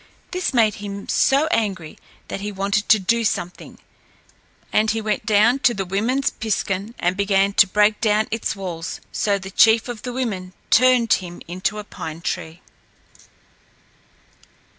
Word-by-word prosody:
This 365 Hz, 0 st, -1 dB
made 225 Hz, -5 st, +3 dB
him 200 Hz, -1 st, -7 dB
so 275 Hz, +3 st, +3 dB
angry 190 Hz, -8 st, -2 dB, 0.3 s
that 195 Hz, -, -5 dB
he 205 Hz, +1 st, -4 dB
wanted 200 Hz, +1 st, -1 dB
to 220 Hz, -, +7 dB
do 230 Hz, +4 st, 0 dB
something, 180 Hz, -4 st, -3 dB, 1.0 s
and 220 Hz, +1 st, +3 dB
he 225 Hz, -, 0 dB
went 215 Hz, 0 st, -3 dB
down 220 Hz, +5 st, +4 dB
to 240 Hz, -2 st, +2 dB
the 195 Hz, -1 st, -3 dB
woman's 225 Hz, +9 st, 0 dB
piskun 210 Hz, 0 st, -3 dB
and 180 Hz, +1 st, 0 dB
began 200 Hz, 0 st, +2 dB
to 200 Hz, -, +5 dB
break 210 Hz, +2 st, +2 dB
down 215 Hz, -1 st, +2 dB
its 225 Hz, 0 st, -2 dB
walls, 180 Hz, -4 st, -6 dB
so 200 Hz, -1 st, 0 dB
the 190 Hz, 0 st, -9 dB
chief 225 Hz, +3 st, +4 dB
of 240 Hz, -3 st, -6 dB
the 250 Hz, -, -5 dB
women 205 Hz, -8 st, -4 dB, 0.2 s
turned 250 Hz, -1 st, +5 dB
him 175 Hz, -2 st, -3 dB
into 185 Hz, +4 st, -2 dB
a 210 Hz, -, -5 dB
pine 160 Hz, -5 st, -8 dB
tree. 165 Hz, +1 st, -5 dB
210 Hz, 155 wpm, -21 LUFS, 190-225 Hz, 1.0 s, to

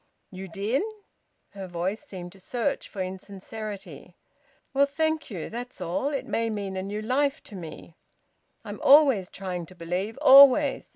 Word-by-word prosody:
"You 190 Hz, 0 st, -8 dB
did?" 205 Hz, -, -1 dB, 0.7 s
Her 195 Hz, -1 st, -8 dB
voice 180 Hz, +4 st, -3 dB
seemed 185 Hz, -11 st, -9 dB
to 195 Hz, -, -17 dB
search 235 Hz, +5 st, -3 dB
for 195 Hz, -3 st, -4 dB
insincerity. 200 Hz, +2 st, -8 dB, 0.6 s
"Well, 280 Hz, +1 st, +4 dB
thank 315 Hz, +1 st, -1 dB
you. 180 Hz, -8 st, -5 dB
That's 245 Hz, +2 st, -7 dB
all. 180 Hz, +11 st, -2 dB
It 280 Hz, -2 st, -3 dB
may 230 Hz, 0 st, -1 dB
mean 200 Hz, -3 st, -4 dB
a 190 Hz, -, -2 dB
new 205 Hz, +3 st, -5 dB
life 275 Hz, +5 st, 0 dB
to 205 Hz, -, -12 dB
me. 170 Hz, -1 st, -9 dB, 0.7 s
I'm -, -, -7 dB
always 270 Hz, -, +6 dB
trying 180 Hz, -3 st, -5 dB
to 185 Hz, -, -15 dB
believe; 180 Hz, +7 st, -4 dB
always! 280 Hz, 0 st, +7 dB
205 Hz, 155 wpm, -26 LUFS, 185-270 Hz, 0.7 s, always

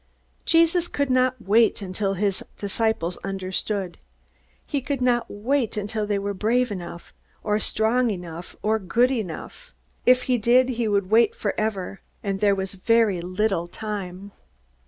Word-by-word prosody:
Jesus 335 Hz, +1 st, +4 dB
could 280 Hz, -4 st, -1 dB
not 255 Hz, 0 st, +2 dB
wait 220 Hz, +2 st, +3 dB
until 195 Hz, 0 st, -2 dB
his 195 Hz, 0 st, -1 dB
disciples 200 Hz, -4 st, -1 dB
understood. 190 Hz, 0 st, -3 dB, 0.7 s
He 285 Hz, -3 st, -2 dB
could 275 Hz, +1 st, -2 dB
not 245 Hz, -1 st, +1 dB
wait 235 Hz, +2 st, -1 dB
until 210 Hz, +1 st, -2 dB
they 205 Hz, -1 st, +1 dB
were 200 Hz, +1 st, -2 dB
brave 235 Hz, +5 st, +1 dB
enough, 175 Hz, -3 st, -7 dB, 0.3 s
or 210 Hz, 0 st, +1 dB
strong 230 Hz, +4 st, +1 dB
enough 175 Hz, -3 st, -6 dB
or 220 Hz, +1 st, +2 dB
good 235 Hz, +7 st, +2 dB
enough. 235 Hz, -, -5 dB, 0.3 s
If 250 Hz, 0 st, +5 dB
he 250 Hz, -2 st, +1 dB
did, 250 Hz, +4 st, +4 dB
he 235 Hz, -2 st, -1 dB
would 200 Hz, -2 st, 0 dB
wait 225 Hz, 0 st, +5 dB
forever. 205 Hz, -2 st, -2 dB, 0.2 s
And 195 Hz, -1 st, -2 dB
there 200 Hz, -1 st, +3 dB
was 190 Hz, 0 st, -4 dB
very 210 Hz, -2 st, +2 dB
little 185 Hz, 0 st, -1 dB
time. 200 Hz, -1 st, -6 dB
210 Hz, 145 wpm, -24 LUFS, 195-240 Hz, 0.7 s, If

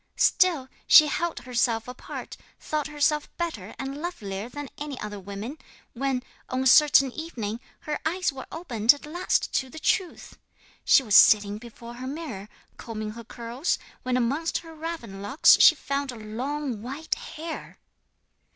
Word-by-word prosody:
Still 335 Hz, -8 st, +3 dB, 0.2 s
she 310 Hz, -, +9 dB
held 340 Hz, +3 st, -2 dB
herself 235 Hz, -2 st, 0 dB
apart, 250 Hz, 0 st, -8 dB, 0.2 s
thought 305 Hz, -1 st, -2 dB
herself 300 Hz, 0 st, 0 dB
better 315 Hz, -, -4 dB
and 275 Hz, +2 st, -5 dB
lovelier 215 Hz, -, -5 dB
than 290 Hz, +2 st, -7 dB, 0.3 s
other 210 Hz, -1 st, -6 dB
women, 200 Hz, +9 st, -7 dB, 0.3 s
when, 260 Hz, 0 st, -1 dB, 0.3 s
on 260 Hz, +1 st, -1 dB
a -, -, -4 dB
certain 275 Hz, 0 st, +6 dB
evening, 240 Hz, -9 st, -5 dB, 0.2 s
her 300 Hz, -1 st, -3 dB
eyes 355 Hz, -1 st, 0 dB
were 265 Hz, -, -8 dB
opened 245 Hz, -7 st, +3 dB
at 285 Hz, -, -12 dB
last 350 Hz, +4 st, -1 dB
to 265 Hz, -, 0 dB
the 285 Hz, -, -11 dB
truth. 355 Hz, +3 st, -1 dB, 0.4 s
She 270 Hz, -, +6 dB
was 215 Hz, -4 st, +1 dB
sitting 205 Hz, -1 st, +6 dB
before 235 Hz, 0 st, -11 dB
her 255 Hz, +2 st, -7 dB
mirror, 265 Hz, -9 st, -6 dB, 0.3 s
combing 215 Hz, -2 st, -5 dB
her 230 Hz, +2 st, -9 dB
curls, 235 Hz, +7 st, -2 dB, 0.2 s
when 255 Hz, 0 st, 0 dB
amongst 280 Hz, +7 st, 0 dB
her 325 Hz, -1 st, -10 dB
raven 310 Hz, -12 st, -6 dB
locks 205 Hz, +10 st, +5 dB
she -, -, +9 dB
found 280 Hz, -1 st, -3 dB
a -, -, -9 dB
long 245 Hz, +3 st, -4 dB
white 275 Hz, +7 st, -3 dB
hair! 320 Hz, +1 st, -7 dB
265 Hz, 150 wpm, -26 LUFS, 225-305 Hz, 0.4 s, she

